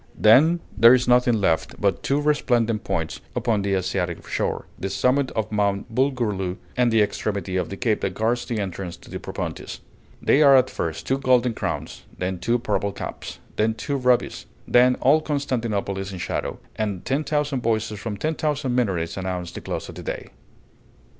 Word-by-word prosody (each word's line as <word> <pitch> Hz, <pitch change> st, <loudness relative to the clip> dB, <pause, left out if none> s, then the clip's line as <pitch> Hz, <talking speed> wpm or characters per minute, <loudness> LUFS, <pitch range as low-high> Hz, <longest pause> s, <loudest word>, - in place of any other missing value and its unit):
Then 155 Hz, +11 st, +5 dB
there 115 Hz, +3 st, +8 dB
is 125 Hz, 0 st, 0 dB
nothing 125 Hz, -1 st, +4 dB
left 85 Hz, -5 st, 0 dB
but 100 Hz, -1 st, +1 dB
two 140 Hz, +1 st, +1 dB
resplendent 120 Hz, -7 st, +1 dB
points 80 Hz, -4 st, -3 dB
upon 110 Hz, -3 st, +1 dB
the 100 Hz, 0 st, 0 dB
Asiatic 95 Hz, -2 st, -2 dB
shore, -, -, -2 dB
the 95 Hz, -, -3 dB
summit 125 Hz, +7 st, +1 dB
of 110 Hz, -1 st, -2 dB
Mount 100 Hz, +1 st, 0 dB
Bulgurlu, 110 Hz, -8 st, 0 dB, 0.2 s
and 125 Hz, -1 st, +3 dB
the 110 Hz, -1 st, +5 dB
extremity 100 Hz, -2 st, -3 dB
of 90 Hz, -2 st, -1 dB
the 100 Hz, -, -6 dB
cape 110 Hz, -2 st, 0 dB
that 95 Hz, -1 st, -2 dB
guards 120 Hz, +2 st, 0 dB
the 120 Hz, -3 st, -3 dB
entrance 95 Hz, -3 st, -4 dB
to -, -, -16 dB
the -, -, -4 dB
Propontis; -, -, -5 dB, 0.4 s
they 145 Hz, -, +3 dB
are 140 Hz, -2 st, +8 dB
at 130 Hz, 0 st, +2 dB
first 80 Hz, -1 st, -4 dB
two 135 Hz, +1 st, 0 dB
golden 125 Hz, -2 st, +3 dB
crowns, -, -, -4 dB, 0.2 s
then 90 Hz, 0 st, -2 dB
two 120 Hz, +5 st, +1 dB
purple 105 Hz, -3 st, -1 dB
caps, -, -, -7 dB, 0.2 s
then 110 Hz, +1 st, +2 dB
two 140 Hz, +5 st, -3 dB
rubies; 125 Hz, -2 st, +1 dB, 0.2 s
then 125 Hz, +1 st, +5 dB
all 145 Hz, +5 st, +5 dB
Constantinople 115 Hz, -10 st, -2 dB
is 95 Hz, +1 st, -5 dB
in 95 Hz, -, -6 dB
shadow, 90 Hz, -, -3 dB, 0.2 s
and 105 Hz, -4 st, -3 dB
ten 140 Hz, +3 st, 0 dB
thousand 150 Hz, -3 st, -1 dB
voices 110 Hz, -2 st, -1 dB
from 105 Hz, -1 st, -4 dB
ten 155 Hz, +7 st, -1 dB
thousand 150 Hz, -4 st, -1 dB
minarets 95 Hz, -9 st, 0 dB
announce 90 Hz, -2 st, -3 dB
the -, -, -8 dB
close -, -, -4 dB
of -, -, -9 dB
the -, -, -8 dB
day. -, -, -5 dB
110 Hz, 185 wpm, -23 LUFS, 100-130 Hz, 0.4 s, there